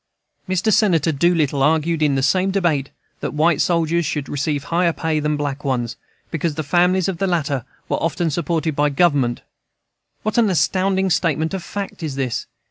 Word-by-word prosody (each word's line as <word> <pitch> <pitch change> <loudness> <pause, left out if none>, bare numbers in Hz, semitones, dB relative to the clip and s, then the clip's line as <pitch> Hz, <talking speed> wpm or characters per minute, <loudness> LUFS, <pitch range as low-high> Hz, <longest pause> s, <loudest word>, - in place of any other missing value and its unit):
Mr. 185 +4 +1
Senator 170 -7 +3
Doolittle 150 -2 +1
argued 160 +2 +2
in 145 -2 +3
the 135 - 0
same 185 +7 +2
debate 170 -8 0 0.3
that - - -4
white 160 +1 +3
soldiers 170 0 +1
should 145 -1 -3
receive 145 0 -2
higher 170 +3 +1
pay 160 -1 -1
than 150 0 0
black 145 -1 -3
ones, 125 -4 -1 0.4
because 165 -1 -1
the 155 - -3
families 180 +4 +2
of 185 -4 -3
the 195 - +1
latter 145 -8 -1 0.2
were - - -1
often 165 0 0
supported 160 0 -1
by 145 +1 +2
Government 140 -6 +1 0.8
What 215 +2 +1
an 225 -3 +4
astounding 190 +3 +1
statement 160 0 +1
of 190 -3 -3
fact 200 -3 -6
is 155 -4 -4
this! 130 -4 -2
160 Hz, 175 wpm, -20 LUFS, 145-175 Hz, 0.8 s, an